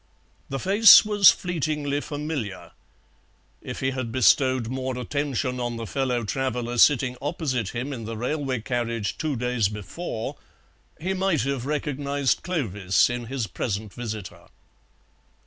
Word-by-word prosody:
The 135 - -2
face 205 +8 +8
was 205 -3 +7
fleetingly 150 -4 -1
familiar; 145 - -5 0.9
if - - -7
he 135 0 +1
had 130 -3 -4
bestowed 130 +1 +3
more 130 +1 -3
attention 130 0 -2
on 120 -1 -3
the 115 - -5
fellow 125 -1 -1
traveller 120 +1 -2
sitting 130 -2 +4
opposite 140 - -2
him 130 +4 -3
in 115 -4 -6
the 115 0 -5
railway 130 0 -2
carriage 115 -3 -2
two 155 -2 -1
days 125 -4 0
before 110 - -6 0.6
he 185 +4 -2
might 190 -6 +1
have 135 0 -2
recognized 145 -2 -1
Clovis 105 - +1
in 120 -1 -4
his 130 -2 -2
present 105 +1 -4
visitor. 110 -6 -7
130 Hz, 130 wpm, -25 LUFS, 115-145 Hz, 0.9 s, face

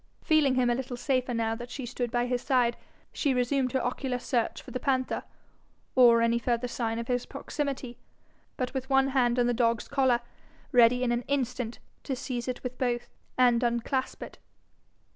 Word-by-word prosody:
Feeling 300 -4 +3
him 255 -1 +3
a - - +3
little 245 0 -4
safer 255 0 0
now 225 -1 0
that 240 +2 -7
she 260 0 -5
stood 245 0 -3
by 240 +1 0
his 245 0 -1
side, 245 -3 +2 0.4
she 280 -4 +1
resumed 255 +1 +1
her 260 - 0
ocular 250 0 -2
search 240 -2 -1
for - - -11
the 255 - -3
panther, 260 0 0 0.7
or 235 -2 +6
any 230 0 +2
further 240 0 0
sign 230 -2 -2
of 235 0 -4
his 245 -1 -1
proximity, 275 -4 -4 0.6
but 255 0 -2
with 265 0 -4
one 270 0 +4
hand 250 -2 +2
on 245 - +3
the 245 - +2
dog's 230 -1 +1
collar, 260 -4 +2 0.5
ready 245 +1 +5
in 245 - +1
an 240 0 +1
instant 250 -4 -2 0.2
to 270 - -3
seize 250 -2 -4
it 255 - -4
with 250 0 -5
both, 240 -2 -1 0.3
and 245 -2 +4
unclasp 240 +2 -1
it. - - -11
245 Hz, 185 wpm, -28 LUFS, 240-260 Hz, 0.7 s, or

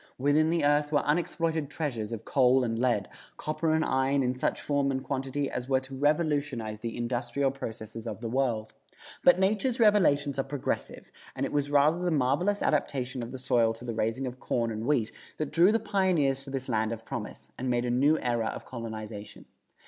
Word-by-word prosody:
Within 145 +4 +3
the 165 -3 +1
earth 145 0 +2
were 145 -2 +2
unexploited 160 -1 0
treasures 120 -9 -3
of 115 - -6
coal 130 -1 +4
and 115 -1 -1
lead, 120 -5 +1 0.3
copper 155 +1 -1
and 160 - +1
iron 135 +1 +2
in 125 0 +1
such 130 - -1
form 145 -1 0
and 130 -1 -2
quantity 135 +1 -2
as 125 0 -5
were 130 -1 +3
to 135 0 -9
revolutionize 145 -6 0
the 115 0 -5
industrial 120 +3 -1
processes 115 -3 -7
of - - -5
the 115 - -4
world. 115 -3 -1 0.5
But 180 - +7
nature's 215 +6 +1
revelations 150 - +3
are - - +2
progressive, 135 0 -4 0.2
and - - -1
it - - -4
was 145 -1 0
rather 145 +4 +4
the 180 0 0
marvelous 155 +7 +1
adaptation 130 -3 0
of 115 - -6
the 130 - -6
soil 120 -3 +2
to 115 +2 -11
the 120 - -3
raising 115 +4 -1
of 125 0 -6
corn 115 -3 -1
and 110 +2 -4
wheat 125 -7 +1 0.3
that 155 -2 -3
drew 175 +4 +5
the 225 - +2
pioneers 175 -11 +1
to - - -8
this 135 -1 -4
land 110 -2 0
of 115 -1 -6
promise, - - -7
and 130 - -2
made 120 0 +1
a 120 - 0
new 140 +6 +4
era 120 -2 0
of - - -5
colonization. 110 -3 -7
135 Hz, 200 wpm, -28 LUFS, 120-150 Hz, 0.5 s, But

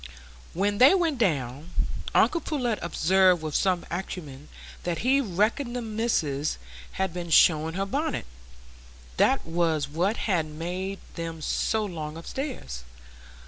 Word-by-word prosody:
When 205 +3 0
they 265 +9 +8
went 330 -8 +1
down, 145 - 0 0.5
uncle 335 - +4
Pullet 245 -9 -1
observed, 180 +1 +3
with 155 -1 -4
some 185 0 +1
acumen, 155 -6 -6 0.3
that 175 -2 -2
he 275 +2 +4
reckoned 230 - 0
the 245 - -2
missis 210 -11 -1 0.4
had 190 -3 -1
been 175 -1 -5
showing 160 0 +5
her 195 +1 0
bonnet,—that 60 - -3
was 165 -3 0
what 175 +9 0
had 175 -7 +1
made 180 +5 -4 0.2
them 165 -1 -5
so 215 +7 0
long 160 -5 -5
upstairs. 165 - -5
175 Hz, 125 wpm, -27 LUFS, 150-215 Hz, 0.5 s, they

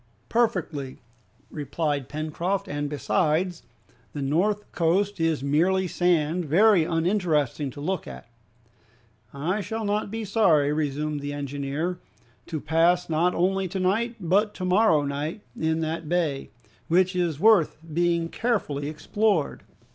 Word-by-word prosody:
"Perfectly," 165 - -1 0.5
replied 145 -2 -2
Pencroft, 170 +6 -2
"and 145 -3 -3
besides, 160 +4 0 0.5
the 145 - -4
north 200 +9 0
coast 185 +4 +1
is 165 -4 0
merely 180 +7 +2
sand, 175 -1 +1
very 185 +4 +5
uninteresting 165 - 0
to 130 - -10
look 185 +6 -3
at." - - -9 1.0
"I 170 +9 -2
shall 220 +4 -4
not 205 0 -1
be 225 +1 -4
sorry," 170 -9 +3
resumed 150 0 -2
the 145 0 -5
engineer, 145 +5 -3 0.5
"to 160 - -3
pass 165 +4 +2
not 170 +3 +2
only 190 +2 +1
to 190 +2 -4
night 220 +6 0
but 200 +4 +1
to 185 - -4
morrow 185 -4 +4
in 160 +3 -3
that 160 0 -3
bay, 160 -6 -1 0.4
which 185 +2 +3
is 170 -5 0
worth 210 -4 +4 0.2
being 170 0 +1
carefully 165 - -1
explored." 165 +2 0
170 Hz, 125 wpm, -25 LUFS, 150-190 Hz, 1.0 s, very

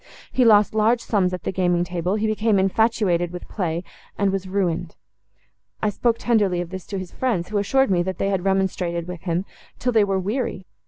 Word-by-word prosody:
He 255 - +3
lost 210 -3 +5
large 220 +2 +3
sums 195 -6 +1
at 180 -1 -5
the - - -1
gaming 175 -2 +1
table; 180 +2 -2
he 215 0 -1
became 215 -1 +2
infatuated 190 -3 +2
with 180 0 -8
play; 170 -4 -2 0.3
and 200 -1 +2
was 195 -1 -3
ruined. 180 -3 -1 0.8
I 210 - 0
spoke 235 +3 +1
tenderly 210 -7 +1
of 175 0 -4
this 190 -1 -7
to 200 - -4
his 185 -2 -6
friends, 215 -10 -1
who 210 -1 0
assured 265 +4 +2
me, 175 -2 +3
that 185 +1 -3
they 195 - 0
had 190 -3 -1
remonstrated 185 -3 0
with 180 -2 -7
him, 175 +1 -1 0.3
till 250 - 0
they 220 -3 +4
were 195 -1 0
weary. 200 0 -2
190 Hz, 205 wpm, -23 LUFS, 180-215 Hz, 0.8 s, lost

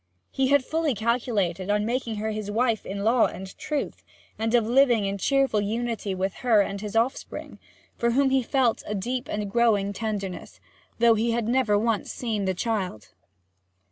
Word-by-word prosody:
He 265 -1 +1
had 280 -1 +3
fully 315 -5 0
calculated 210 -5 -1
on 210 0 +2
making 235 -1 -2
her 215 +1 -2
his 215 -1 -4
wife 225 +1 0
in 200 +1 -4
law 230 +2 +4
and 190 0 -9
truth, 300 -2 -3 0.4
and 225 +2 +1
of 235 -2 +3
living 240 -3 +4
in 195 0 -2
cheerful 270 -2 +2
unity 220 -2 -2
with 190 +1 -1
her 235 -4 +4
and 200 0 -3
his 210 0 -6
offspring, 235 +4 -2 0.4
for 235 - +2
whom 265 +3 +2
he 265 0 +3
felt 250 -1 +1
a 210 - -2
deep 245 +6 -3
and 210 -1 -2
growing 205 -3 +2
tenderness, 200 -3 -5 0.4
though 235 0 +5
he 230 +1 +1
had 230 -2 -1
never 235 -4 +2
once 220 0 0
seen 220 -5 -2
the 190 -1 0
child. 185 - -3
225 Hz, 175 wpm, -25 LUFS, 205-245 Hz, 0.4 s, though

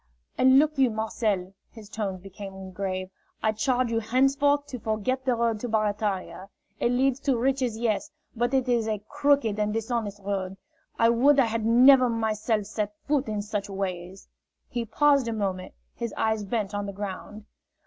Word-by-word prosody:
"And 260 +1 +5
look 300 0 +3
you, 260 -2 +5
Marcel," 215 -4 -2 0.2
his 220 -3 -13
tones 200 -4 -4
became 190 0 -9
grave, 185 0 -4 0.3
"I 220 - +3
charge 245 +3 0
you 225 - +1
henceforth 275 +5 +2
to 250 - -6
forget 220 +5 -1
the 255 -2 +2
road 230 -2 0
to 245 - -4
Barataria. 205 -3 -2 0.3
It 240 - +1
leads 260 +1 +2
to 270 -4 +1
riches, 255 -2 0
yes, 230 +5 -1 0.3
but 240 +2 0
it 265 -1 +1
is 235 -3 +1
a 210 -2 -2
crooked 280 -8 +1
and 210 0 +1
dishonest 220 -2 -2
road. 195 -1 -3 0.4
I 230 - +4
would 270 +5 +4
I 265 - +5
had 225 -1 -1
never 255 +2 +7
myself 220 -1 -1
set 210 0 -3
foot 290 -2 +1
in 210 -1 -2
such 205 -1 -4
ways!" 190 -1 -5 0.4
He 240 -1 -3
paused 280 +3 +3
a 230 - -1
moment, 190 -4 -3 0.2
his 235 -1 -5
eyes 220 -1 0
bent 210 -1 -2
on 205 0 -3
the 200 - -5
ground." 205 +1 -7
220 Hz, 175 wpm, -26 LUFS, 205-250 Hz, 0.4 s, never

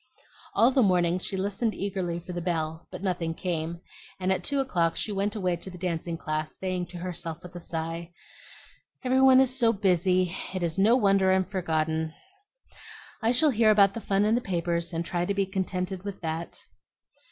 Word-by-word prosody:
All 235 +3 +5
the 260 - +3
morning 180 -4 +3
she 190 - -4
listened 205 +4 -1
eagerly 185 -3 -2
for 180 +1 -8
the 175 - -3
bell, 160 -2 -2
but - - -8
nothing 170 -4 -1
came; 170 -1 -3 0.4
and 185 0 0
at 190 - 0
two 280 -1 0
o'clock 175 -11 +1
she 215 - -3
went 205 +2 -1
away 185 -4 0
to 180 - -7
the 180 - -10
dancing 170 -1 -3
class, 155 -1 -3
saying 185 -2 -2
to 180 - -9
herself 170 -1 -5
with 180 0 -11
a - - -5
sigh, 165 0 -4 0.9
"Every 260 +1 +3
one 260 -1 +7
is 260 -1 +3
so 235 -3 +4
busy, 185 -3 +2 0.2
it 185 - -1
is 170 +2 -1
no 220 +5 +6
wonder 195 -5 +4
I'm 190 0 +3
forgotten. 160 -3 -1 1.1
I 225 0 +3
shall 295 +4 +4
hear 225 -2 +4
about 200 -2 +5
the 230 - -5
fun 200 0 +1
in 215 - +3
the 240 - +2
papers, 170 -3 -1
and 165 0 -2
try 175 0 -1
to 200 +3 -1
be 200 -1 +2
contented 190 -1 -3
with 200 -1 -6
that." 165 0 -5
185 Hz, 195 wpm, -27 LUFS, 170-200 Hz, 1.1 s, one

